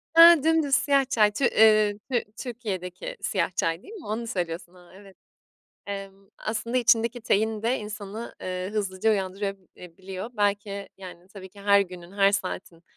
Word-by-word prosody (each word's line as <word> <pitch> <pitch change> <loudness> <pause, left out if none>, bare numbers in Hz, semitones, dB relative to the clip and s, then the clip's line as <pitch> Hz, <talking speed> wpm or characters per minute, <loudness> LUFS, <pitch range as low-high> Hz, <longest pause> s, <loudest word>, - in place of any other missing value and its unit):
Hıı, 335 -3 +9
dümdüz 320 -4 +3
siyah 275 +1 +3
çay, 210 -4 +4
Tü 245 +5 0
,eee, 215 -2 +5
Tü 240 -2 +1 0.2
Türkiye'deki 225 - -5
siyah - - 0
çay, 165 +1 0
değil 430 - -12
mi? 405 -7 -10
Onu 225 +3 -3
söylüyorsun, 175 -3 -4
aaa, 180 -1 -18
evet. 195 0 -16 0.7
Emm, 195 -1 -7
aslında 230 +3 -3
içindeki 235 0 +2
tein 220 0 0
de 245 +3 +1
insanı, 210 +1 -7
ııı, 185 0 -3
hızlıca 205 0 0
uyandırabiliyor. 190 -1 -5
Belki, 200 -2 -1
yani, 180 -1 -11
tabii 190 -2 -11
ki 200 +2 -16
her 200 0 +5
günün, 180 -1 -6
her 200 0 +4
saatin, 185 -3 -4
205 Hz, 155 wpm, -26 LUFS, 190-230 Hz, 0.7 s, Hıı